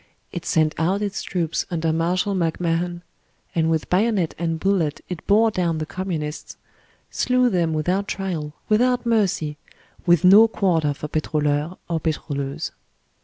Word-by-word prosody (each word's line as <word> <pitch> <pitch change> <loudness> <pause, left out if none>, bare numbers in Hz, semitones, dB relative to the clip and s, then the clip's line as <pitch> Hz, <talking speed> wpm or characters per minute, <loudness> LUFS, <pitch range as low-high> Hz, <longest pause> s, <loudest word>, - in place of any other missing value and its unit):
It 175 - -6
sent 155 -1 +2
out 190 +5 +1
its 200 -1 -3
troops 170 -3 -2
under 165 -2 0
Marshal 180 +5 0
MacMahon, 175 0 -1 0.5
and 160 -1 +1
with 160 -1 0
bayonet 195 -3 +1
and 165 -1 -1
bullet 180 -6 +1
it 180 -3 -6
bore 220 +2 +4
down 175 -5 0
the 155 - -3
Communists, 160 -4 -5 0.5
slew 250 -1 +2
them 170 -4 +1
without 180 +6 0
trial, 170 -6 -3
without 245 +3 +2
mercy, 195 -10 +1 0.5
with 175 -2 +5
no 205 +5 +8
quarter 165 -9 +1
for 150 - -6
pitroliur 150 +2 -1
or 165 -2 -1
pitroleuse. 140 -3 -3
170 Hz, 140 wpm, -22 LUFS, 155-195 Hz, 0.5 s, no